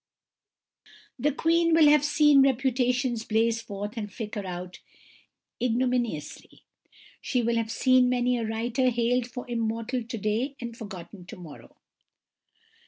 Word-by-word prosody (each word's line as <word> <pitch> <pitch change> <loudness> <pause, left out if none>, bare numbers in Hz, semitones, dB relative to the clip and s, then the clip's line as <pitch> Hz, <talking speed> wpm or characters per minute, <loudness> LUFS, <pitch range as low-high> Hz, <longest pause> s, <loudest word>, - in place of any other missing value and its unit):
The 295 - +2
Queen 330 +3 +2
will 320 -2 +6
have 295 -1 +5
seen 295 -1 +5
reputations 250 -2 +1
blaze 225 +1 +1
forth 205 -1 -6
and 205 -2 -4
flicker 210 -1 -5
out 180 0 -7 0.8
ignominiously; 245 - -2 0.6
she 250 -2 -1
will 235 0 +1
have 225 -1 -1
seen 255 +1 +3
many 250 0 +1
a - - -2
writer 230 +3 0
hailed 240 +1 0
for 250 0 -8
immortal 230 +1 -2
to 230 0 -6
day 225 +7 -1
and 235 -1 -6
forgotten 195 -4 -10
to - - -9
morrow. 165 -5 -13
235 Hz, 130 wpm, -27 LUFS, 220-255 Hz, 0.8 s, will